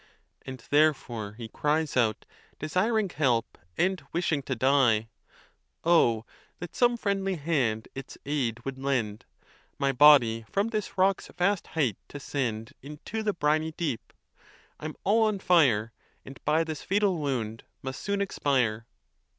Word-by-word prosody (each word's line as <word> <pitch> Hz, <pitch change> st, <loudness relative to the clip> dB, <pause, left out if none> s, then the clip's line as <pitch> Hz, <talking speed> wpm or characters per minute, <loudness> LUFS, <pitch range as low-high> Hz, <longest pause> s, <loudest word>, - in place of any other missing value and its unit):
And 130 Hz, -3 st, -7 dB
therefore 135 Hz, -8 st, +1 dB
he 115 Hz, +1 st, -8 dB
cries 150 Hz, +6 st, -1 dB
out, 115 Hz, -4 st, +1 dB, 0.3 s
desiring 200 Hz, +7 st, +1 dB
help, 125 Hz, -8 st, 0 dB, 0.2 s
and 185 Hz, -1 st, +1 dB
wishing 165 Hz, -4 st, 0 dB
to 130 Hz, -1 st, -3 dB
die, 120 Hz, -4 st, +3 dB, 0.7 s
Oh 120 Hz, -10 st, +3 dB, 0.3 s
that 175 Hz, -, -8 dB
some 240 Hz, -1 st, +3 dB
friendly 195 Hz, -3 st, -1 dB
hand 135 Hz, -9 st, 0 dB
its 135 Hz, -, -8 dB
aid 125 Hz, -5 st, -2 dB
would 135 Hz, -1 st, -5 dB
lend, 120 Hz, -6 st, -1 dB, 0.5 s
My 140 Hz, 0 st, +1 dB
body 125 Hz, -5 st, +6 dB
from 200 Hz, +3 st, 0 dB
this 215 Hz, -3 st, -4 dB
rock's 190 Hz, +1 st, +2 dB
vast 180 Hz, +2 st, 0 dB
height 130 Hz, -11 st, +1 dB
to 145 Hz, -, -8 dB
send 115 Hz, -6 st, -3 dB
Into 150 Hz, +10 st, -6 dB
the 210 Hz, -1 st, 0 dB
briny 155 Hz, 0 st, 0 dB
deep! 155 Hz, -8 st, -3 dB, 0.7 s
I'm 155 Hz, 0 st, -6 dB
all 215 Hz, +4 st, +3 dB
on 215 Hz, -2 st, +1 dB
fire, 130 Hz, -, +3 dB, 0.3 s
And 135 Hz, -, -11 dB
by 155 Hz, +2 st, +3 dB
this 160 Hz, -3 st, -5 dB
fatal 195 Hz, -3 st, +1 dB
wound 120 Hz, -6 st, -3 dB, 0.2 s
must 130 Hz, 0 st, -5 dB
soon 200 Hz, 0 st, -1 dB
expire. 125 Hz, -, 0 dB
145 Hz, 140 wpm, -28 LUFS, 120-175 Hz, 0.7 s, body